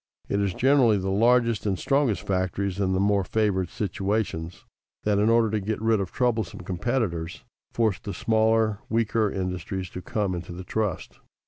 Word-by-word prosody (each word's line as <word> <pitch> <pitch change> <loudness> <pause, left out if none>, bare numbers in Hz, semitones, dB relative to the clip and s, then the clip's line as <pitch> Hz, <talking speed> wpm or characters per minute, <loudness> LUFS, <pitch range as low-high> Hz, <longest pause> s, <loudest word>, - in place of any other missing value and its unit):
It 100 - 0
is 100 -2 -1
generally 130 -5 +4
the 95 0 -2
largest 115 +1 +3
and 95 -2 0
strongest 135 -5 +1
factories, 95 +1 -1
in 95 -2 +1
the 95 - +1
more 100 0 +2
favored 95 -3 0
situations, 95 -4 -3 0.4
that, 105 -1 +2
in 105 +2 +3
order 115 -2 +3
to 110 - 0
get 105 +2 -3
rid 110 -1 +2
of 95 -2 -3
troublesome 115 -10 -1
competitors, 90 -3 -2 0.3
force 110 -6 +1
the 100 - -6
smaller, 110 +1 +2
weaker, 110 -1 +1
industries 90 0 -4
to 90 - -6
come 100 +1 -1
into 85 0 -6
the 90 +2 -7
trust. 105 0 -3
100 Hz, 165 wpm, -25 LUFS, 95-110 Hz, 0.4 s, generally